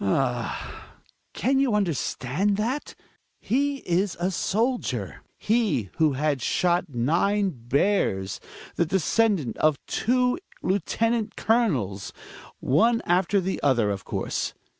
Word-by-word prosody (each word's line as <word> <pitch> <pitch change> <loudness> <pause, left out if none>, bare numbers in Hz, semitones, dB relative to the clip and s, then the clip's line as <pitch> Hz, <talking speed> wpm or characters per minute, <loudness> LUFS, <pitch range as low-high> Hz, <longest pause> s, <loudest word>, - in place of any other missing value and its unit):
Ah! 120 +4 -2 0.4
Can 265 +2 +1
you 265 -6 +2
understand 190 0 0
that? 245 +7 -2 0.4
He 280 +3 0
a 180 0 0
soldier; 230 +8 -1 0.2
he 205 - 0
who 155 -3 +3
had 145 0 0
shot 175 -1 +1
nine 175 - +1
bears, 120 - 0 0.4
the 170 - +3
descendant 190 - +1
of 155 -2 +3
two 250 +4 +1 0.2
lieutenant 220 +4 0
colonels 140 - 0 0.2
— - - -18
one 230 - +2
after 185 +3 +2
the 190 +1 -2
other, 120 -7 +2
of 100 -1 -4
course. - - -3
185 Hz, 110 wpm, -25 LUFS, 135-225 Hz, 0.4 s, who